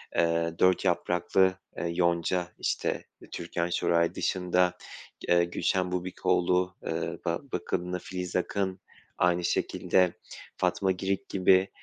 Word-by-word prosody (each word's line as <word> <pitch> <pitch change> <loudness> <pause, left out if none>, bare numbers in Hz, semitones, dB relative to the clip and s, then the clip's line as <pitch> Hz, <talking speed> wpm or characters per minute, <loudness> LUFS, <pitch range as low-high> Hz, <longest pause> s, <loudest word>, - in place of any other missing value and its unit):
eee, 85 0 +2
Dört 90 +1 +4
Yapraklı, 90 +1 +2 0.2
eee, - - -3
Yonca, 85 0 +1
işte, - - -1 0.3
Türkan 85 0 -3
Şoray 85 -1 +1
dışında, 90 -1 +1 0.5
eee, 85 0 +5
Gülşen 90 +1 0
Bubikoğlu, 90 0 +1
aaa, - - -4
ba 85 0 0
bakımlı 90 0 -2
Filiz 90 -1 -5
Akın, 95 +1 -1 0.4
aynı 90 0 +2
şekilde 90 +1 +2 0.4
Fatma 95 -1 +1
Girik 95 +1 -2
gibi, 95 0 +4
90 Hz, 110 wpm, -28 LUFS, 85-95 Hz, 0.5 s, eee